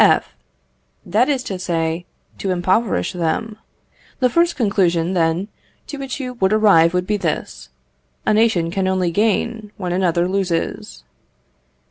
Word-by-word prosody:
F. - - +3 0.7
That 220 +10 +2
is 270 -3 0
to 190 -6 -5
say, 165 -1 -2 0.3
to 195 - -3
impoverish 185 - +1
them. 185 +6 -2 0.6
The 250 -2 +2
first 340 +4 +2
conclusion, 185 - +1
then, 170 +2 +1 0.4
to 290 - -7
which 270 0 -5
you 255 -2 -4
would 190 0 +2
arrive 185 -6 +5
would 180 0 0
be 210 +2 0
this, 160 - -4 0.6
a - - +3
nation 210 -7 +2
can 190 0 -1
only 185 -2 +1
gain 215 +2 0
when 180 -4 -3
another 175 -1 +1
loses. 175 - -2
190 Hz, 140 wpm, -20 LUFS, 170-220 Hz, 0.7 s, arrive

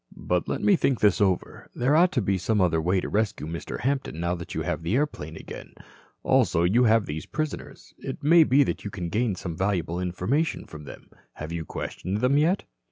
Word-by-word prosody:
"But - - -1
let - - -3
me 205 - +5
think 135 -7 +1
this 105 -1 +3
over. 95 -3 -1
There 130 +5 +2
ought 175 +3 +5
to 125 - +1
be 95 0 0
some 105 +4 0
other 85 -3 +2
way 90 +4 +1
to - - -4
rescue 105 -8 -1
Mr. 85 +2 -6
Hampton 135 - -2
now 85 +1 0
that 85 -1 -7
you - - -1
have - - -2
the 85 +7 -1
airplane 125 - -2
again. - - -10 0.5
Also 85 - +3
you 115 +8 +4
have 110 -2 +4
these 75 +1 -6
prisoners. 155 -1 -5
It - - -7
may 165 +3 +7
be 140 0 +4
that - - -3
you 100 - -4
can 90 -4 -5
gain 110 +2 0
some 90 -2 -6
valuable 90 -2 -1
information 90 - -1
from 75 -2 -11
them. - - -12 0.2
Have 75 +1 -7
you 85 -1 -4
questioned 95 +6 -4
them 140 +3 +3
yet?" 170 +6 +2
100 Hz, 215 wpm, -26 LUFS, 85-130 Hz, 0.5 s, may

